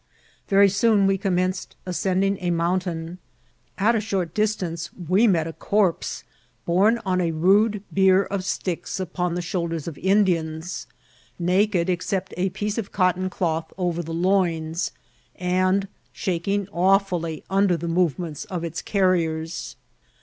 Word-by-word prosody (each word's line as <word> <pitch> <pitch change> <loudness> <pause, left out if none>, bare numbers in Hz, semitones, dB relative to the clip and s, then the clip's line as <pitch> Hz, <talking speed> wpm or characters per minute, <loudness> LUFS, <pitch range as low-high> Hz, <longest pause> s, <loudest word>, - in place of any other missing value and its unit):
Very 200 0 +6
soon 205 0 +3
we 195 0 +2
commenced 185 -1 -1
ascending 190 +2 0
a 180 - -1
mountain. 170 0 -1 0.6
At 215 +4 +3
a 225 - +2
short 190 -6 -2
distance 185 -6 -1
we 185 +6 +2
met 170 -6 +2
a 165 - -5
corpse 200 -2 0 0.4
borne 200 +7 +3
on 185 -1 +1
a 170 - +1
rude 195 +6 +3
bier 190 0 +5
of 195 -1 -3
sticks, 180 -1 -3
upon 180 -1 -2
the 175 - -2
shoulders 170 -3 -3
of 160 - -6
Indians, 175 -4 0 0.5
naked 185 0 +2
except 185 +1 -2
a 185 +2 0
piece 210 +4 -3
of 200 - -5
cotton 185 0 +1
cloth 165 -3 -2
over 175 -2 -1
the 165 -1 -7
loins, 170 -2 0 0.4
and 185 +2 +1 0.2
shaking 195 +2 -1
awfriUy 180 -3 +1
under 195 -2 +3
the 170 +1 -5
movements 170 0 -1
of 180 -5 -4
its 165 0 -4
carriers. 170 -4 0
185 Hz, 135 wpm, -24 LUFS, 170-195 Hz, 0.6 s, Very